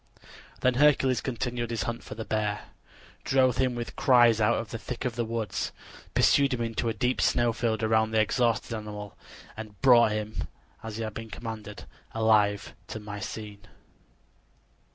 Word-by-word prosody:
Then 130 - +3
Hercules 135 -4 +4
continued 120 -2 -3
his 115 -1 -2
hunt 120 0 -4
for - - -8
the 110 0 -6
boar, 105 -1 -1 0.6
drove 130 -2 +3
him 130 -2 +1
with 120 -1 -5
cries 120 -4 +5
out 105 - +3
of 115 -1 -5
the 115 - -5
thick 125 +2 -6
of 125 -2 -2
the 120 - 0
woods, 115 -1 -3 0.4
pursued 140 -2 +4
him 120 - -5
into 115 0 -1
a - - -1
deep 125 +5 0
snow 120 -1 +2
field, 110 -1 0
bound 110 0 +2
the 110 - +2
exhausted 115 +1 +1
animal, 105 -1 -7 0.4
and 105 -2 -9
brought 120 -4 +7
him, 105 0 -4 0.3
as 110 -1 -6
he 115 - -3
had 110 -1 -4
been 110 +1 -7
commanded, 110 -2 -7 0.3
alive 105 -2 +2
to 110 - -6
Mycene. 105 0 -7
115 Hz, 165 wpm, -28 LUFS, 110-120 Hz, 0.6 s, brought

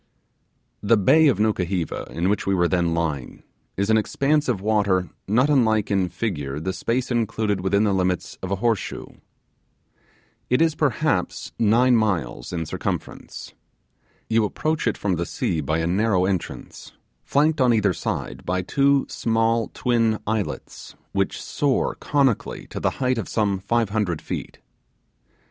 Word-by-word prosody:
The 110 +2 +4
bay 155 +11 +5
of 130 -9 +3
Nukuheva 95 -5 -1
in 85 +2 -1
which 105 0 0
we 100 - +2
were 90 -1 +3
then 85 -2 +1
lying 75 -7 -3 0.3
is 100 +3 +1
an 110 - +5
expanse 145 +6 +1
of 115 -6 0
water 100 -3 +1 0.2
not 120 +7 +3
unlike 110 -8 +2
in 95 -2 +1
figure 75 -12 -3
the 95 +4 -3
space 125 +6 -2
included 110 -4 0
within 100 +2 +2
the 105 -2 +2
limits 90 -1 -1
of 95 - -4
a 100 - +1
horse 115 0 +1
shoe. - - -8 1.3
It 125 - +3
is, 165 -1 +3
perhaps, 145 - -1
nine 120 +3 +4
miles 90 - -1
in 85 -2 -3
circumference. - - -5 0.7
You 115 0 +2
approach 155 +8 -1
it 115 - 0
from 95 -4 -1
the 85 - -1
sea 80 - -1
by 80 +3 -1
a 80 - -1
narrow 95 +1 +2
entrance, 95 -3 -4 0.3
flanked 150 +1 +2
on 125 -1 +5
each 105 -5 +2
side - - -4
by 90 +1 -1
two 140 +5 +2
small 115 0 +1
twin 115 -3 +1
islets 110 -2 -4 0.2
which - - -1
soar 140 -3 0
conically 140 -6 0
to - - -5
the - - +1 0.2
height 125 -2 +1
of 105 - -5
some 100 -3 0
five 115 +2 0
hundred 100 -6 -1
feet. - - -6
105 Hz, 155 wpm, -23 LUFS, 90-120 Hz, 1.3 s, bay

